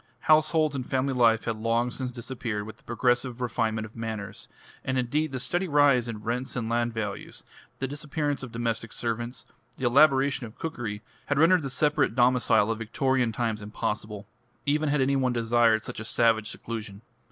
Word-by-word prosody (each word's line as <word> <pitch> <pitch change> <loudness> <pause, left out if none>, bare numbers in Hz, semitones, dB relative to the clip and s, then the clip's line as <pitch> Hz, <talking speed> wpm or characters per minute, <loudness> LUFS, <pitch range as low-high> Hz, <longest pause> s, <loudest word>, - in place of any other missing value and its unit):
Households 155 -1 +3
and 130 - -2
family 130 +2 -1
life 115 -3 +4
had 115 -2 -2
long 115 +2 0
since 130 0 -3
disappeared 120 -3 -4
with 110 - -10
the - - -26
progressive 120 +1 0
refinement 110 -2 -1
of 110 - -13
manners; 110 -3 -5 0.4
and 130 - -1
indeed 145 +5 0
the 130 - -3
steady 175 +8 -1
rise 145 -5 +4
in 110 -2 -6
rents 125 +3 -3
and 120 -3 -2
land 120 +1 0
values, 105 -3 -5 0.3
the 135 - -2
disappearance 145 0 -3
of 130 -3 -7
domestic 115 -1 -3
servants, 120 +1 -4 0.3
the 130 - -3
elaboration 135 -1 +4
of 110 - -16
cookery, 115 -10 -5 0.2
had 145 - 0
rendered 170 +4 +5
the 135 - -4
separate 150 -3 +1
domicile 120 -4 +3
of 115 - -3
Victorian 125 +2 0
times 110 -2 -2
impossible, 105 0 -4 0.4
even 150 +1 +1
had 145 -1 +2
any 135 +1 +2
one 130 -2 +1
desired 115 -1 +3
such - - -6
a - - -5
savage 115 -1 +2
seclusion. 110 -3 -7
120 Hz, 175 wpm, -27 LUFS, 115-135 Hz, 0.4 s, rendered